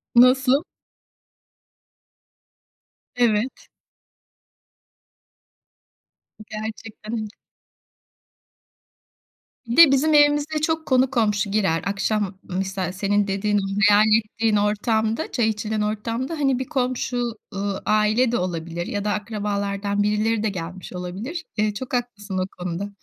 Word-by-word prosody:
Nasıl? 255 +4 +5 2.5
Evet. 240 0 0 2.8
Gerçekten. 215 0 -6 2.4
Bir 235 - -2
de 330 -5 +9
bizim 300 +3 +3
evimize 295 +1 +3
çok 320 +1 0
konu 260 0 +3
komşu 210 -5 +1
girer. 190 -6 +1
Akşam 200 -1 -1
misal 190 -1 -3
senin 205 +2 0
dediğin, 205 +1 0 0.3
hayal 205 +1 +6 0.2
ettiğin 225 0 0
ortamda, 220 +4 0
çay 230 -3 +1
içilen 215 0 -2
ortamda, 230 +7 -2
hani 270 -5 +1
bir 260 - -3
komşu, 255 -3 -1 0.4
ııı, 200 0 -3
aile 215 +3 +3
de 240 - +1
olabilir 170 -1 -3
ya 205 0 -3
da 210 - +1
akrabalardan 205 -1 -2
birileri 210 +1 +1
de 220 - +1
gelmiş 180 0 -7
olabilir. 200 - -5
Eee, 210 0 +1
çok 255 +5 -7
haklısın 215 -6 -3
o 185 - 0 0.2
konuda. 180 +3 -3
215 Hz, 105 wpm, -23 LUFS, 200-245 Hz, 2.8 s, de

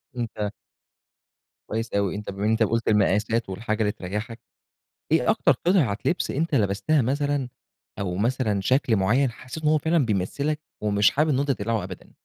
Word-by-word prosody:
أنت 110 -4 -3 1.2
كويس 115 +1 -3
أوي. 100 -2 0
أنت 105 0 -6
بما 100 +2 -4
إن 110 +1 +3
قُلت 115 0 +1
المقاسات 105 +1 +2
والحاجة 110 +3 -2
اللي 105 -1 +2
تريّحك، 105 +6 -5 0.7
إيه - - +4
أكتر - - +3
قطعة 140 - +3
لِبْس 180 - 0
أنت 160 +3 -1
لبستها 115 +6 +2
مثلًا 140 +1 0 0.5
أو 90 -3 -2
مثلًا 110 -2 0
شكل 125 +1 +2
معيّن 120 +7 +2
حسّيت 130 +7 -9
إن - - +4
هو 155 0 +4
فعلًا 160 0 +2
بيمثِّلك 140 +10 -1 0.2
ومش 105 -1 +3
حابب 150 +3 +1
إنه 135 - +2
أنت 140 0 -1
تقلعه 110 -4 -1
أبدًا 95 -1 -10
115 Hz, 160 wpm, -25 LUFS, 105-140 Hz, 1.2 s, إيه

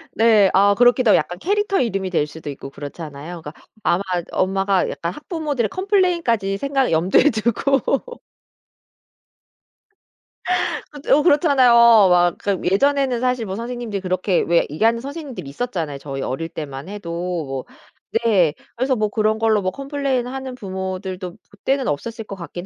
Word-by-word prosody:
네. 215 -4 +5
아 200 +1 +5
그렇기도 245 0 +4
하고 - - +6
약간 175 - -3
캐릭터 410 - 0
이름이 195 -6 -1
될 155 -4 0
수도 150 0 -9
있고 135 -1 -8
그렇잖아요. 150 +3 -8
그러니까 150 -1 -9 0.3
아마 175 - +2 0.3
엄마가 195 0 +1
약간 170 +1 -4
학부모들의 300 - -3
컴플레인까지 340 - +1
생각 270 +2 0
염두에 175 - +4
두고. 275 - 0 2.7
그것도 290 -1 +2
어 - - +3
그렇잖아요. 290 -6 +4
막 195 -7 +6
그 200 -3 -1
예전에는 265 +5 +2
사실 250 -2 0
뭐 190 -1 -4
선생님들이 235 -3 -4
그렇게 185 0 0
왜 170 0 +2
얘기하는 225 +10 +1
선생님들이 275 - -7
있었잖아요 165 - -4
저희 135 -1 -6
어릴 165 +6 -3
때만 140 0 -7
해도 200 -5 -7 0.3
뭐 135 -1 -5 0.6
네. 185 -9 +3 0.2
그래서 260 +2 0
뭐 215 -2 0
그런 215 0 +1
걸로 220 -2 +2
뭐 185 - -1
컴플레인하는 265 0 -3
부모들도 190 -3 -5 0.2
그때는 265 +6 -1
없었을 225 +10 -4
것 200 - -7
같긴 175 0 -8
210 Hz, 355 characters per minute, -21 LUFS, 180-260 Hz, 2.7 s, 하고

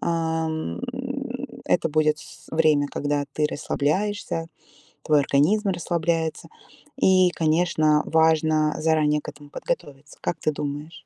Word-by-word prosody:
А, 160 -1 0
м, 160 - -4 0.9
это 165 - +2
будет 155 0 +2
с - - -14
время, 155 -3 +3
когда 145 0 -1
ты 155 - 0
расслабляешься, 165 +4 -1 0.6
твой 150 -2 +4
организм 190 +11 +2
расслабляется. 170 -2 -1 0.5
И, 185 -6 +5
конечно, 155 -2 +2
важно 155 -1 +3
заранее 155 -2 +2
к - - -7
этому 145 0 -13
подготовиться. 145 - -5
Как - - -2
ты 155 - 0
думаешь? 150 +2 -6
155 Hz, 120 wpm, -24 LUFS, 150-165 Hz, 0.9 s, И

